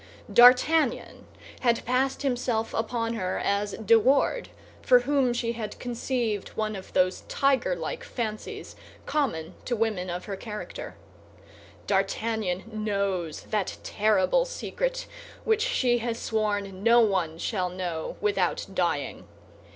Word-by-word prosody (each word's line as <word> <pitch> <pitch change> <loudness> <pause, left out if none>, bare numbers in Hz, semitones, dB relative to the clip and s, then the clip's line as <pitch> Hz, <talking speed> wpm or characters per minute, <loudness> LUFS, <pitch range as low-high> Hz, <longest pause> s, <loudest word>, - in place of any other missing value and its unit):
D'Artagnan 255 +3 +5 0.3
had 235 -2 +1
passed 260 +3 0
himself 245 -4 -1
upon 230 0 -1
her 185 -5 -2
as 200 0 0
De 225 +1 +4
Wardes, 275 - +2 0.3
for 250 -1 +5
whom 270 -1 +2
she 240 -1 -1
had 220 -2 -6
conceived 240 -3 -2
one 215 -1 -1
of 190 - -9
those 185 0 +2
tigerlike 280 - 0
fancies 220 - -5 0.3
common 235 - -1
to 245 - 0
women 215 -5 -1
of 175 +1 -4
her 200 - -4
character. 210 +1 -7 0.9
D'Artagnan 195 -1 0 0.2
knows 195 -6 -1
that 210 -4 -1
terrible 215 - +2
secret - - -3 0.4
which 440 -1 +2
she 255 - +2
has 230 0 -2
sworn 205 -4 -2
no 235 +3 +6
one 185 -7 +1
shall 185 0 -1
know 175 -3 -4
without 420 0 +1
dying. - - -1
225 Hz, 120 wpm, -27 LUFS, 200-255 Hz, 0.9 s, no